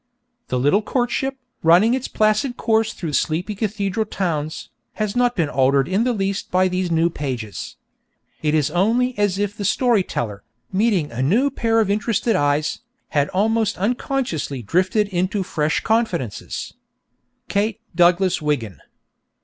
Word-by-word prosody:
The 125 - -1
little 145 +11 +3
courtship, 260 +4 -1 0.2
running 180 +8 +5
its 260 0 -1
placid 215 +4 +1
course 220 -1 +1
through 165 -5 -5
sleepy 170 +8 0
cathedral 205 0 -2
towns, 155 -7 -3 0.2
has 215 0 -2
not 245 0 +2
been 165 -5 +1
altered 135 0 +2
in 195 +5 +1
the 250 - +2
least 195 -3 -2
by 185 +1 +3
these 185 0 -1
new 165 +1 +2
pages. 125 -9 -5 0.7
It 155 0 +1
is 150 -1 +1
only 235 +8 +2
as 205 -2 +1
if 205 0 -1
the 205 - -5
story 235 +1 +3
teller, 105 - -4 0.3
meeting 195 -6 +1
a 120 +2 -3
new 230 - +2
pair 225 -3 +1
of 210 -3 +2
interested 220 +2 +1
eyes, 145 +1 +1 0.3
had 145 -1 +1
almost 220 +2 +1
unconsciously 200 - -2
drifted 185 - +1
into 190 +2 -1
fresh 155 -3 -1
confidences._ 185 - -2 0.7
_KATE 205 +1 0 0.2
DOUGLAS 175 +1 +3
WIGGIN. 130 - -2
190 Hz, 145 wpm, -21 LUFS, 155-220 Hz, 0.7 s, running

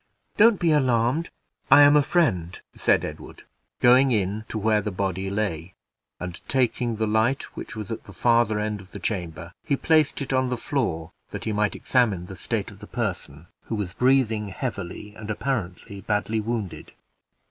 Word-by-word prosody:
"Don't 220 -1 +5
be 170 -2 +2
alarmed, 130 +2 +2 0.4
I 145 - +9
am 145 +1 +7
a 150 - +6
friend," 110 - +1 0.2
said - - +2
Edward, - - -9 0.4
going 130 +2 +6
in 105 -1 0
to - - -3
where 110 0 +2
the 105 - -3
body 95 -1 -2
lay; 95 -4 -3 0.4
and, 90 -1 -6
taking 125 -2 +1
the 110 +1 0
light 110 +5 0
which - - -7
was 105 -2 -6
at 110 - -5
the - - -11
farther 115 +2 +2
end 105 -1 -2
of 95 - -16
the 100 - -6
chamber, 85 -4 -4
he 145 - +1
placed 155 +1 +2
it 135 -1 -3
on 130 -1 +2
the 125 - -1
floor, 90 - -2 0.2
that - - -6
he 110 - -1
might 105 0 0
examine 110 -9 +1
the 95 - -9
state - - -3
of - - -14
the - - -10
person, 75 +4 -4 0.2
who 115 - -3
was 100 -4 -3
breathing 125 -5 +2
heavily, 105 -2 -5
and 110 -1 -9
apparently 105 -4 -3
badly 105 +2 -1
wounded. 110 -4 -4
110 Hz, 180 wpm, -25 LUFS, 95-125 Hz, 0.4 s, I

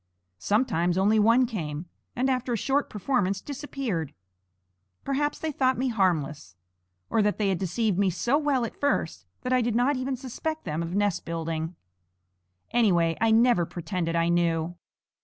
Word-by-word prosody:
Sometimes 180 - +1
only 210 +3 +4
one 230 +4 +5
came, 165 - -4 0.3
and 255 +2 +1
after 255 -2 0
a - - 0
short 275 +6 0
performance 200 -3 0
disappeared. 265 - -4 0.9
Perhaps 290 +2 0
they 320 - -3
thought 260 -2 +1
me 260 +1 0
harmless, 155 - 0 0.6
or 225 - +3
that 210 0 +1
they 205 -2 +1
had 185 -3 0
deceived 195 +1 0
me 200 -1 +3
so 235 +9 0
well 290 -5 +1
at - - -7
first 165 - -1
that 255 - -1
I 255 - +4
did 235 -1 0
not 255 +4 +2
even 260 +1 -2
suspect 295 +5 -4
them 155 -1 -2
of 170 +2 -4
nest 205 -3 +1
building. 165 0 -3 1.0
Anyway, 175 -8 +3
I 225 - +4
never 225 -4 +4
pretended 170 0 -3
I 165 0 +2
knew. 170 -1 +1
210 Hz, 160 wpm, -27 LUFS, 170-255 Hz, 1.0 s, one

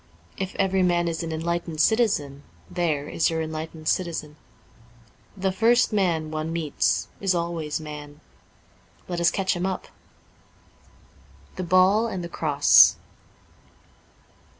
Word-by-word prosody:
If 190 0 -5
every 190 -1 +1
man 175 -1 +2
is 165 0 -2
an 165 -1 -4
enlightened 165 0 -3
citizen, 160 - +1 0.3
there 160 -5 -1
is 165 - +1
your 165 -1 -2
enlightened 160 0 -6
citizen. 165 -5 -2 1.0
The 190 0 0
first 230 +5 +3
man 170 -6 0
one 155 +1 -3
meets 165 -3 0
is 190 -2 +1
always 170 -3 -2
man. 150 -1 -9 0.9
Let 175 -1 -3
us 170 - +5
catch 190 0 -1
him 175 +2 -1
up.' 190 - -5 0.8
* - - -28
The 185 - -4
Ball 185 +5 +4
and 190 -5 -4
the 170 - -6
Cross. 145 -4 +5
170 Hz, 125 wpm, -24 LUFS, 155-185 Hz, 1.0 s, us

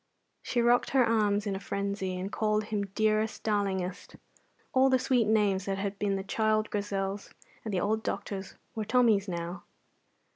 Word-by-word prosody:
She 240 -1 0
rocked 240 +1 +3
her 255 - +6
arms 210 -2 +2
in 200 -2 -1
a - - -4
frenzy, 200 -1 -3
and 190 +2 -4
called 215 -1 +1
him 210 -2 -2
dearest, 215 0 +1
darlingest. 195 -3 -2 0.6
All 265 +1 +5
the 260 - +4
sweet 250 -3 +2
names 205 -3 +2
that 195 -1 -1
had 200 0 -3
been 200 -1 +1
the 195 - -3
child 215 +1 0
Grizel's 200 -1 -2 0.3
and 220 - -4
the 185 -3 0
old 220 +2 0
doctor's 195 -2 -4 0.2
were 220 - -3
Tommy's 215 -3 +3
now. 175 0 -4
205 Hz, 170 wpm, -29 LUFS, 195-220 Hz, 0.6 s, her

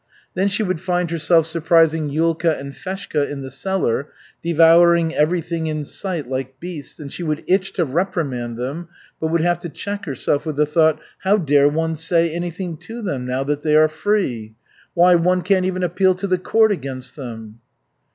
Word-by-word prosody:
Then 190 +2 +1
she 200 +2 +1
would 185 -4 -1
find 180 -1 -1
herself 165 0 +3
surprising 160 -1 +2
Yulka 165 +1 +1
and 140 0 -7
Feshka 185 -4 -3
in 140 -1 -6
the 130 - -7
cellar, 140 -3 -1 0.3
devouring 170 0 +5
everything 165 +1 0
in 155 -1 -3
sight, 170 -4 -3
like 130 0 -5
beasts, 165 -6 -8
and 145 -3 -8
she - - -4
would 155 -2 -2
itch 190 +1 +1
to 175 - 0
reprimand 135 -7 -2
them, 140 +8 -5 0.3
but 160 - -1
would 165 +1 +1
have 175 0 +1
to 170 - -6
check 200 +7 -5
herself 140 0 -1
with 155 -2 -4
the 150 +1 +3
thought, 155 0 +2 0.2
"How 200 +2 +3
dare 145 -5 +4
one 160 +2 -1
say 165 +1 +1
anything 175 0 -4
to 230 +7 -8
them, 135 -10 -3
now 130 +2 -1
that 145 +1 -2
they 150 0 +2
are 155 0 +6
free? 155 - -2 0.4
Why 180 +1 +6
one 180 +1 +2
can't 185 +1 +2
even 185 0 -1
appeal 185 +2 +2
to 185 - -4
the 185 -2 +1
court 220 +4 +3
against 130 -7 -5
them!" 115 -5 -8
165 Hz, 185 wpm, -20 LUFS, 145-180 Hz, 0.4 s, are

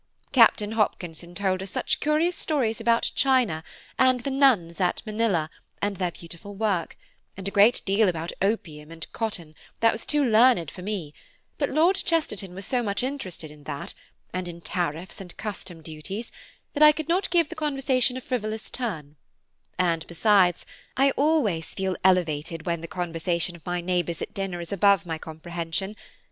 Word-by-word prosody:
Captain 220 -4 +5
Hopkinson 175 -5 -2
told 190 -1 0
us 190 - -4
such - - -1
curious 310 +4 +2
stories 240 -8 0
about 230 0 +2
China, 250 - +2 0.4
and 255 -1 +4
the 275 - -3
nuns 225 -11 +3
at 180 - +1
Manilla, 215 -7 +1 0.3
and 205 -1 -1
their 180 -2 0
beautiful 170 +4 -10
work; 195 -5 -1 0.4
and 195 0 -5
a - - -2
great 205 +5 +5
deal 200 +1 +3
about 165 -1 -3
opium 160 -7 -1
and 165 0 -6
cotton 180 -9 -3 0.3
that 225 0 +5
was 220 - -4
too 295 -2 +1
learned 225 - +5
for 180 - -10
me, 185 -7 -4 0.5
but 285 - +1
Lord 335 +6 +3
Chesterton 210 - 0
was 195 0 -6
so 250 +3 +1
much 205 0 -1
interested 190 - -4
in 150 -1 -16
that, 140 - -5 0.4
and 185 -1 -3
in 170 -1 -7
tariffs 175 0 -3
and 180 -2 -10
custom 185 -5 -6
duties, 165 +9 -6 0.4
that 290 - -3
I 305 0 +10
could 305 0 -5
not 355 +4 +1
give 335 -3 +3
the 345 - -7
conversation 270 -4 +1
a - - -5
frivolous 220 -4 -3
turn; 155 - -4 0.6
and 170 -3 +1
besides, 180 0 +3 0.3
I 275 +1 +5
always 270 - +1
feel 190 -1 -1
elevated 165 -3 +1
when 170 -2 -1
the 165 - -6
conversation 170 0 -1
of 165 - -15
my 175 0 -1
neighbours 175 -2 -1
at - - -5
dinner 195 -3 -3
is 170 +3 -4
above 200 -1 +4
my 160 -2 -4
comprehension. 170 +4 -4
195 Hz, 170 wpm, -26 LUFS, 170-240 Hz, 0.6 s, I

